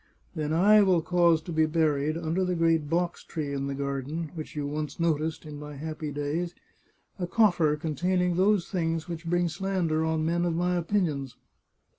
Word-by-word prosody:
Then 155 Hz, -2 st, -2 dB
I 205 Hz, +6 st, +6 dB
will 185 Hz, -5 st, +3 dB
cause 170 Hz, -2 st, +3 dB
to 175 Hz, -, -7 dB
be 160 Hz, -1 st, +2 dB
buried, 155 Hz, -1 st, +1 dB
under 170 Hz, +3 st, -1 dB
the 180 Hz, -1 st, 0 dB
great 165 Hz, -3 st, +2 dB
box 170 Hz, +1 st, -1 dB
tree 145 Hz, -3 st, -4 dB
in 140 Hz, 0 st, -2 dB
the 140 Hz, -, -3 dB
garden, 140 Hz, +3 st, -3 dB
which 155 Hz, -2 st, -7 dB
you 145 Hz, -1 st, -2 dB
once 150 Hz, +2 st, -4 dB
noticed, 160 Hz, -1 st, 0 dB
in 150 Hz, -1 st, -8 dB
my 150 Hz, 0 st, -8 dB
happy 155 Hz, +1 st, -5 dB
days, 150 Hz, +5 st, -2 dB, 0.6 s
a 180 Hz, -, -2 dB
coffer 175 Hz, -8 st, +3 dB
containing 175 Hz, +4 st, 0 dB
those 190 Hz, 0 st, +3 dB
things 165 Hz, -3 st, -1 dB
which 165 Hz, -1 st, -6 dB
bring 175 Hz, +1 st, +2 dB
slander 170 Hz, -2 st, -1 dB
on 160 Hz, -1 st, 0 dB
men 170 Hz, +1 st, +1 dB
of 170 Hz, -2 st, 0 dB
my 180 Hz, +1 st, +1 dB
opinions. 165 Hz, -8 st, -1 dB
165 Hz, 180 wpm, -27 LUFS, 150-175 Hz, 0.6 s, I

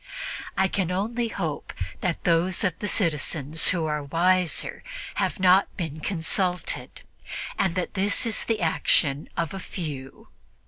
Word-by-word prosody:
I 190 Hz, -, +4 dB
can 190 Hz, -2 st, -1 dB
only 225 Hz, +6 st, 0 dB
hope 165 Hz, -9 st, -4 dB, 0.3 s
that 175 Hz, -2 st, -1 dB
those 175 Hz, +2 st, +2 dB
of 185 Hz, -, +2 dB
the 210 Hz, -, -2 dB
citizens 160 Hz, -4 st, +2 dB
who 170 Hz, -3 st, +1 dB
are 150 Hz, -1 st, -1 dB
wiser 175 Hz, +4 st, +1 dB, 0.3 s
have -, -, 0 dB
not 185 Hz, +1 st, +6 dB
been 160 Hz, -5 st, -4 dB
consulted 180 Hz, +2 st, -1 dB, 0.5 s
and 180 Hz, -3 st, +1 dB
that 185 Hz, -, -2 dB
this 200 Hz, +3 st, +2 dB
is 225 Hz, -2 st, 0 dB
the 225 Hz, -3 st, 0 dB
action 150 Hz, -3 st, +2 dB
of 170 Hz, 0 st, -1 dB
a 195 Hz, -, -4 dB
few. 145 Hz, -8 st, -7 dB
180 Hz, 140 wpm, -26 LUFS, 160-190 Hz, 0.5 s, not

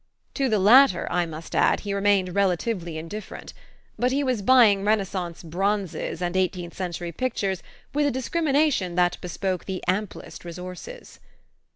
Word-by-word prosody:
To 270 Hz, -2 st, 0 dB
the 215 Hz, -, +2 dB
latter, 215 Hz, +1 st, +6 dB
I 175 Hz, -1 st, +1 dB
must 160 Hz, 0 st, -9 dB
add, -, -, +3 dB
he 200 Hz, -1 st, -3 dB
remained 200 Hz, -2 st, +2 dB
relatively 180 Hz, -3 st, 0 dB
indifferent; 180 Hz, +6 st, -8 dB, 0.5 s
but 250 Hz, +1 st, +2 dB
he 280 Hz, +2 st, +1 dB
was 255 Hz, -5 st, 0 dB
buying 215 Hz, -4 st, +5 dB
Renaissance 195 Hz, -5 st, -1 dB
bronzes 190 Hz, 0 st, -2 dB
and 175 Hz, +1 st, -2 dB
eighteenth 180 Hz, -2 st, -1 dB
century 175 Hz, -2 st, -4 dB
pictures 195 Hz, -4 st, -2 dB, 0.3 s
with 295 Hz, 0 st, +2 dB
a -, -, +1 dB
discrimination 275 Hz, -, +1 dB
that 175 Hz, 0 st, +2 dB
bespoke 185 Hz, +1 st, -3 dB
the 190 Hz, -1 st, -5 dB
amplest 195 Hz, +2 st, -3 dB
resources. 180 Hz, -, -9 dB
195 Hz, 145 wpm, -25 LUFS, 175-230 Hz, 0.5 s, latter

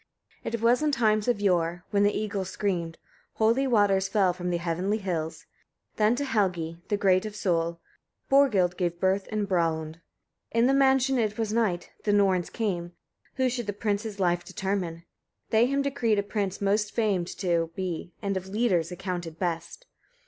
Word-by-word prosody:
1. -, -, -4 dB
It 230 Hz, -, -6 dB
was 240 Hz, +4 st, +4 dB
in 305 Hz, -1 st, +2 dB
times 215 Hz, -4 st, +2 dB
of 245 Hz, -4 st, +2 dB
yore, 175 Hz, -3 st, +1 dB
when 200 Hz, -, +2 dB
the 205 Hz, 0 st, +3 dB
eagles 200 Hz, -3 st, -3 dB
screamed, 175 Hz, -5 st, -2 dB, 0.4 s
holy 230 Hz, +5 st, +2 dB
waters 200 Hz, -5 st, +3 dB
fell 195 Hz, -4 st, +2 dB
from 180 Hz, 0 st, -4 dB
the 175 Hz, -, +1 dB
heavenly 175 Hz, +5 st, -1 dB
hills; 170 Hz, -6 st, -4 dB, 0.5 s
then 215 Hz, +2 st, +3 dB
to 285 Hz, -, -2 dB
Helgi, 180 Hz, -9 st, -1 dB
the 205 Hz, -, 0 dB
great 185 Hz, -2 st, +3 dB
of 215 Hz, -1 st, -6 dB
soul, 170 Hz, -4 st, 0 dB, 0.5 s
Borghild 210 Hz, -11 st, +3 dB
gave 175 Hz, -1 st, -1 dB
birth 190 Hz, +1 st, +1 dB
in 215 Hz, -1 st, -1 dB
Bralund. 165 Hz, -3 st, -1 dB, 0.5 s
2. -, -, -2 dB
In 230 Hz, -, +5 dB
the 265 Hz, -, +4 dB
mansion 270 Hz, -1 st, +3 dB
it 215 Hz, -2 st, 0 dB
was 220 Hz, -2 st, -1 dB
night: 210 Hz, -7 st, 0 dB
the 205 Hz, -, +1 dB
Norns 190 Hz, -3 st, +2 dB
came, 175 Hz, -6 st, -3 dB, 0.4 s
who 260 Hz, -1 st, +2 dB
should 240 Hz, -3 st, -3 dB
the 205 Hz, -, -1 dB
prince's 205 Hz, 0 st, -2 dB
life 175 Hz, -2 st, +1 dB
determine. 185 Hz, -2 st, -3 dB, 0.5 s
They 225 Hz, +2 st, +4 dB
him 275 Hz, +1 st, 0 dB
decreed 235 Hz, -6 st, +1 dB
a 200 Hz, -, +1 dB
prince 200 Hz, -2 st, -3 dB
most 205 Hz, +1 st, +1 dB
famed 200 Hz, -7 st, +1 dB
to 170 Hz, -3 st, 0 dB
be, 180 Hz, -2 st, -4 dB
and 200 Hz, -1 st, -1 dB
of 190 Hz, 0 st, -4 dB
leaders 190 Hz, -5 st, +1 dB
accounted 175 Hz, -3 st, -5 dB
best. 170 Hz, -, -4 dB
200 Hz, 180 wpm, -27 LUFS, 175-220 Hz, 0.5 s, In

